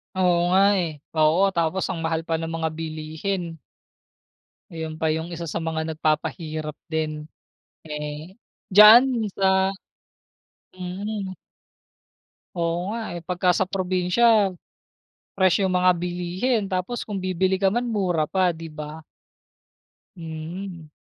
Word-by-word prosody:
Oo 175 Hz, -1 st, +2 dB
nga 195 Hz, -, +6 dB, 0.2 s
eh. 155 Hz, -4 st, -4 dB, 0.2 s
Oo, 170 Hz, +6 st, +4 dB
tapos 170 Hz, +1 st, 0 dB
ang 165 Hz, -, -4 dB
mahal 160 Hz, 0 st, -1 dB
pa 165 Hz, -1 st, -1 dB
ng 165 Hz, -, -3 dB
mga 165 Hz, -1 st, -2 dB
bilihin. 160 Hz, +2 st, -4 dB, 1.1 s
Ayun 160 Hz, -1 st, -6 dB
pa 160 Hz, -, +1 dB
'yung 160 Hz, +2 st, -1 dB
isa 170 Hz, 0 st, -5 dB
sa 165 Hz, +2 st, -3 dB
mga 160 Hz, 0 st, -2 dB
nagpapahirap 155 Hz, 0 st, -2 dB, 0.2 s
din 155 Hz, -1 st, -2 dB, 0.6 s
eh, 150 Hz, +6 st, -6 dB, 0.3 s
diyaan 225 Hz, +3 st, +8 dB
sa, 190 Hz, 0 st, +3 dB, 1.1 s
mhm. 190 Hz, +2 st, -4 dB, 1.2 s
Oo 170 Hz, +4 st, -1 dB
nga 230 Hz, -, -3 dB, 0.2 s
eh, -, -, -7 dB
pagka 180 Hz, 0 st, +2 dB
sa 185 Hz, +2 st, +1 dB
probinsya, 190 Hz, +3 st, +2 dB, 0.8 s
fresh 190 Hz, 0 st, +3 dB
'yung 190 Hz, -1 st, +1 dB
mga 180 Hz, 0 st, +5 dB
bilihin 180 Hz, +6 st, -1 dB
tapos 190 Hz, +5 st, -3 dB
kung 205 Hz, -3 st, -4 dB
bibili 185 Hz, +1 st, 0 dB
ka 195 Hz, -, +4 dB
man 240 Hz, +4 st, -1 dB
mura 185 Hz, -9 st, 0 dB
pa, 185 Hz, +2 st, +2 dB
'di 165 Hz, 0 st, -8 dB
ba. 155 Hz, +1 st, -8 dB, 1.1 s
Mhm. 165 Hz, +1 st, -7 dB
175 Hz, 125 wpm, -24 LUFS, 160-190 Hz, 1.2 s, diyaan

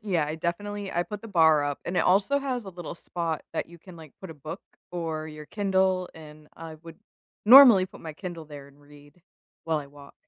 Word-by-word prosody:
yeah, 175 Hz, -8 st, 0 dB
I 155 Hz, -, -4 dB
definitely 200 Hz, +4 st, -4 dB
I 175 Hz, -, +1 dB
put 210 Hz, 0 st, -8 dB
the 225 Hz, -, -9 dB
bar 160 Hz, -5 st, +4 dB
up, 145 Hz, -1 st, -3 dB
and 180 Hz, -, -4 dB
it -, -, +4 dB
also 200 Hz, +10 st, +3 dB
has 255 Hz, -5 st, -3 dB
a 195 Hz, -, -8 dB
little 175 Hz, -2 st, -8 dB
spot 165 Hz, -2 st, -4 dB
that -, -, -3 dB
you 170 Hz, 0 st, -14 dB
can, 175 Hz, +1 st, -14 dB
like, 160 Hz, -3 st, -13 dB
put 190 Hz, -3 st, -9 dB
a -, -, -9 dB
book 155 Hz, +6 st, -8 dB, 0.3 s
or 160 Hz, -3 st, -4 dB
your 150 Hz, -1 st, -10 dB
Kindle, 190 Hz, -3 st, 0 dB
and 155 Hz, -1 st, -14 dB
I 165 Hz, -1 st, -9 dB
would 165 Hz, -1 st, -12 dB, 0.5 s
normally 240 Hz, -7 st, +9 dB
put -, -, -15 dB
my 160 Hz, -1 st, -7 dB
Kindle 170 Hz, -1 st, -8 dB
there 145 Hz, -2 st, -11 dB
and 140 Hz, +1 st, -21 dB
read 145 Hz, +3 st, -19 dB, 0.4 s
while 160 Hz, -2 st, 0 dB
I 145 Hz, -, -7 dB
walk. 140 Hz, 0 st, -16 dB
170 Hz, 220 wpm, -26 LUFS, 155-190 Hz, 0.5 s, normally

